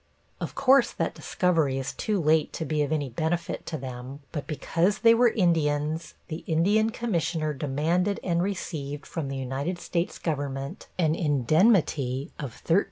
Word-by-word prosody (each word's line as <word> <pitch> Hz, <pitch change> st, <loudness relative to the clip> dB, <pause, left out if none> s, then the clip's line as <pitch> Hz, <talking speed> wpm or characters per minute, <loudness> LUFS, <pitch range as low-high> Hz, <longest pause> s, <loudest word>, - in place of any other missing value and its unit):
Of -, -, -5 dB
course 275 Hz, -1 st, +5 dB
that -, -, -1 dB
discovery 160 Hz, -7 st, +1 dB
is 135 Hz, 0 st, -3 dB
too 210 Hz, -3 st, -1 dB
late 155 Hz, -1 st, +3 dB
to 160 Hz, -, -3 dB
be 155 Hz, -1 st, 0 dB
of 145 Hz, 0 st, 0 dB
any 150 Hz, -3 st, 0 dB
benefit 160 Hz, +7 st, -2 dB
to 160 Hz, -, -3 dB
them, 130 Hz, +1 st, -7 dB
but 145 Hz, -3 st, -5 dB
because 165 Hz, +6 st, 0 dB
they 230 Hz, -1 st, +6 dB
were 240 Hz, +1 st, +5 dB
Indians 160 Hz, -5 st, 0 dB
the 155 Hz, -, -4 dB
Indian 200 Hz, +7 st, +3 dB
Commissioner 170 Hz, -9 st, -1 dB
demanded 160 Hz, +8 st, 0 dB
and 170 Hz, -1 st, +1 dB
received 155 Hz, -7 st, -4 dB
from 160 Hz, -4 st, -4 dB
the 135 Hz, 0 st, -4 dB
United 135 Hz, +7 st, -2 dB
States 175 Hz, 0 st, -2 dB
Government 140 Hz, -3 st, -3 dB
an 160 Hz, -4 st, +2 dB
indemnity 150 Hz, -, +2 dB
of 135 Hz, -6 st, -7 dB
$13,000. 170 Hz, +4 st, +5 dB
160 Hz, 160 wpm, -27 LUFS, 140-180 Hz, -, they